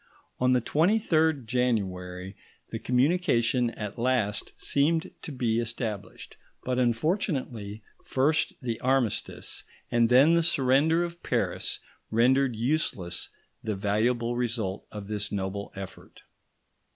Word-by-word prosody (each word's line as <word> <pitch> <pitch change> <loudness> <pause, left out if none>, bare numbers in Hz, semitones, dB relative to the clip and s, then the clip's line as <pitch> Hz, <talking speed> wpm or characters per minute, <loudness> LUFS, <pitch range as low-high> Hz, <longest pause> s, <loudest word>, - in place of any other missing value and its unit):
On 125 0 +4
the 125 - +3
23rd 160 - +2
January 95 -6 -1 0.4
the - - -3
communication 125 -3 +2
at 105 -1 -6
last 115 -5 0
seemed 160 +3 +1
to - - -6
be 120 -4 0
established, 110 -3 -4 0.3
but 125 0 0
unfortunately, 120 - -1 0.2
first 145 +4 +1
the 120 -3 -3
armistice 130 -4 0 0.3
and 120 -1 +3
then 135 +6 +6
the 170 - +4
surrender 155 +2 +3
of 170 0 -6
Paris - - -1 0.3
rendered 125 +2 +3
useless 110 - -1 0.3
the 110 -2 -2
valuable 115 +4 +1
result 115 -5 -2
of 105 -2 -7
this 105 0 -2
noble 100 0 -3
effort. 95 -1 -10
120 Hz, 115 wpm, -28 LUFS, 105-140 Hz, 0.4 s, then